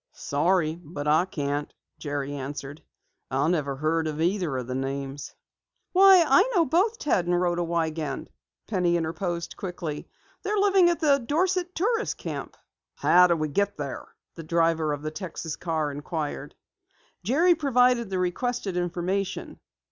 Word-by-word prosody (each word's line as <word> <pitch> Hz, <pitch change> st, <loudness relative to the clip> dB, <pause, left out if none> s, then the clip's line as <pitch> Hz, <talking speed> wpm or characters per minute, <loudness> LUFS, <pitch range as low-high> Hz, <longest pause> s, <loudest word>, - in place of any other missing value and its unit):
"Sorry, 165 Hz, +2 st, 0 dB
but 145 Hz, -2 st, -6 dB
I 155 Hz, +4 st, +4 dB
can't," 145 Hz, -4 st, -3 dB, 0.3 s
Jerry 145 Hz, -1 st, -3 dB
answered. 140 Hz, +1 st, -6 dB, 0.5 s
"I 135 Hz, +3 st, +1 dB
never 145 Hz, -6 st, 0 dB
heard 160 Hz, +3 st, 0 dB
either 165 Hz, -1 st, -1 dB
of 125 Hz, -, -4 dB
the 130 Hz, -, -5 dB
names." 135 Hz, +1 st, -4 dB, 0.6 s
"Why, 380 Hz, -1 st, +7 dB
I 275 Hz, +7 st, +6 dB
know 340 Hz, -3 st, +4 dB
both 380 Hz, -, +2 dB
Ted 185 Hz, -, 0 dB
and 175 Hz, 0 st, +2 dB
Rhoda 175 Hz, -1 st, +1 dB
Wiegand," 160 Hz, -4 st, -2 dB, 0.3 s
Penny 180 Hz, -4 st, +1 dB
interposed 170 Hz, +1 st, -3 dB
quickly. 175 Hz, -5 st, -5 dB, 0.3 s
"They're 420 Hz, +1 st, -1 dB
living 390 Hz, -3 st, +5 dB
at 345 Hz, -1 st, -1 dB
the 285 Hz, -3 st, +4 dB
Dorset 355 Hz, +7 st, 0 dB
Tourist 445 Hz, +6 st, 0 dB
Camp." -, -, -6 dB, 0.4 s
"How 180 Hz, +1 st, +5 dB
do 170 Hz, -, +2 dB
we 155 Hz, -1 st, -1 dB
get 200 Hz, +7 st, 0 dB
there?" 140 Hz, -3 st, -5 dB, 0.3 s
the 165 Hz, -, -8 dB
driver 165 Hz, -1 st, +1 dB
of 145 Hz, 0 st, -4 dB
the 155 Hz, -, -3 dB
Texas 165 Hz, -3 st, -5 dB
car 160 Hz, -4 st, -2 dB
inquired. 150 Hz, +1 st, -5 dB, 0.7 s
Jerry 315 Hz, -, +4 dB
provided 250 Hz, -, +2 dB
the 190 Hz, -, -2 dB
requested 195 Hz, +2 st, -2 dB
information. 180 Hz, +2 st, -2 dB
175 Hz, 145 wpm, -26 LUFS, 150-245 Hz, 0.7 s, Why